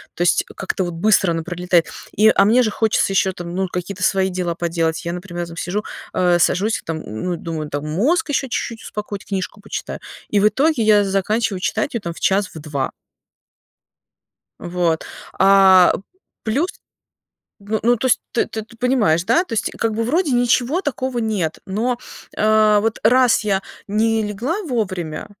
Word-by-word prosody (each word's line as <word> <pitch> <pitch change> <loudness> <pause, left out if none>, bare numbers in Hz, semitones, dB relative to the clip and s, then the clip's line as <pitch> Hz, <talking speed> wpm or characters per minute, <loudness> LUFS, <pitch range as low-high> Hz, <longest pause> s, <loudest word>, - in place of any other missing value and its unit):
То - - -5
есть 175 +1 +3
как-то 190 -1 -2
вот 175 - -4
быстро 190 0 +3
оно 165 -1 -2
пролетает. 175 0 +1 0.3
И, 215 +2 +6
а 195 - +4
мне 245 +4 +4
же 215 - 0
хочется 215 -2 +1
еще 190 0 +2
там, 175 0 -7
ну, 190 0 0
какие-то 180 +1 -5
свои 190 -1 +2
дела 180 -2 -2
поделать. 165 -1 -1
Я, 170 - -3
например, 175 -1 -5
там 165 0 -11
сижу, 205 +6 -2 0.3
э, 175 -1 +3
сажусь, 205 +6 +1
там, 160 -1 -4
ну, 170 +12 -4
думаю, 160 -2 -5
там 145 +1 -4
мозг 295 - +1
еще 270 -1 0
чуть-чуть 230 -2 -4
успокоить, 205 -1 -6
книжку 195 +1 -4
почитаю. - - -6 0.3
И 205 - +2
в 210 - +5
итоге 270 +4 +1
я 210 -1 +5
заканчиваю 195 +1 0
читать 285 +9 -1
ее 235 - -1
там 170 -3 -5
в - - -13
час, 195 0 +1
в - - -6
2. 145 -3 -3 1.7
Вот. 175 -2 -1 0.3
А 190 -2 +6 0.5
плюс, 275 - 0 0.9
ну, 210 +2 -2
ну 240 +1 +4
то 260 - -2
есть 245 - +3
ты - - +1
ты 220 +1 -8
понимаешь, 225 -10 +2
да? 345 - +3
Tо 315 - -11
есть, 220 - 0
как 225 -1 0
бы, 230 - -1
вроде 305 +3 +1
ничего 245 +6 +2
такого 260 -5 -3
нет, 210 -8 -1
но, 235 +5 -1 0.4
а, 215 -1 +4
вот 225 0 -1
раз 250 +2 +4
я 195 -2 +1 0.3
не 220 +1 +1
легла 240 - -3
вовремя 185 - -3
200 Hz, 175 wpm, -20 LUFS, 175-230 Hz, 1.7 s, И